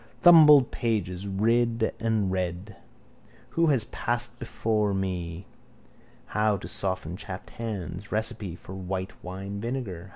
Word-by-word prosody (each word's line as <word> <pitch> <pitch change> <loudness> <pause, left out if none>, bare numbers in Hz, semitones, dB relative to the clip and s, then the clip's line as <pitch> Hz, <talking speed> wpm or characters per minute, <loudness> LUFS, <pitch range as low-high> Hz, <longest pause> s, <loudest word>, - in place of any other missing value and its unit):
Thumbed 150 -6 +8
pages: 100 -5 -2
read 115 +3 +1
and 110 -4 +1
read. 95 +2 -3 0.7
Who 165 0 +2
has 135 -7 +3
passed 120 +2 -2
here 120 - -27
before 110 -4 0
me? 90 -2 -3 0.8
How 105 -1 +1
to - - -8
soften 95 -3 -3
chapped 95 -1 -8
hands. 100 -4 -5
Recipe 110 -4 -1
for 90 - -11
white 95 0 -5
wine 95 +2 -6
vinegar. 110 -7 -4
105 Hz, 125 wpm, -27 LUFS, 95-115 Hz, 0.8 s, Thumbed